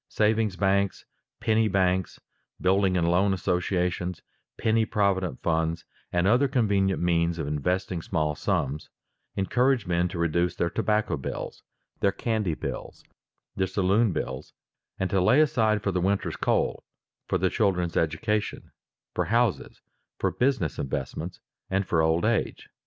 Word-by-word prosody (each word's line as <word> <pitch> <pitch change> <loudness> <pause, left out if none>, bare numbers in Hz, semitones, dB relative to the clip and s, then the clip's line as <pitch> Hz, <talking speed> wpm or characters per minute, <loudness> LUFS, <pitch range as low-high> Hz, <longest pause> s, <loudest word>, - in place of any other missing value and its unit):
Savings 110 -2 +1
banks, 100 +1 +1 0.3
penny 110 -1 +2
banks, 95 -2 +1 0.4
building 95 0 +2
and 85 -1 +1
loan 95 +3 +3
associations, 90 -1 -1 0.3
penny 110 0 +2
provident 95 -8 0
funds, 80 0 0 0.3
and 90 0 +1
other 120 +8 +4
convenient 100 -7 +1
means 85 -1 +1
of 80 - -3
investing 90 +5 -1
small 80 -4 -1
sums, 75 0 -2 0.5
encourage 125 +4 +2
men 90 0 +1
to 90 - -6
reduce 85 +1 +1
their 85 -1 -1
tobacco 105 0 0
bills, - - -6 0.4
their 100 - +3
candy 105 -7 -1
bills, - - -6 0.5
their 95 - 0
saloon 100 +3 +2
bills, - - -4 0.4
and 95 0 -2
to 95 -2 +2
lay 125 +10 +5
aside 110 -8 +2
for 100 - +1
the 90 -1 0
winter's 100 +2 0
coal, - - 0 0.4
for - - +1
the - - +1
children's 90 -4 +1
education, 100 +7 -1 0.4
for - - 0
houses, 115 -2 0 0.3
for - - 0
business 125 - 0
investments, 75 +5 -4 0.3
or 95 +1 +1
for 85 -3 +1
old 80 +1 +2
age. - - -1
95 Hz, 140 wpm, -26 LUFS, 85-105 Hz, 0.5 s, lay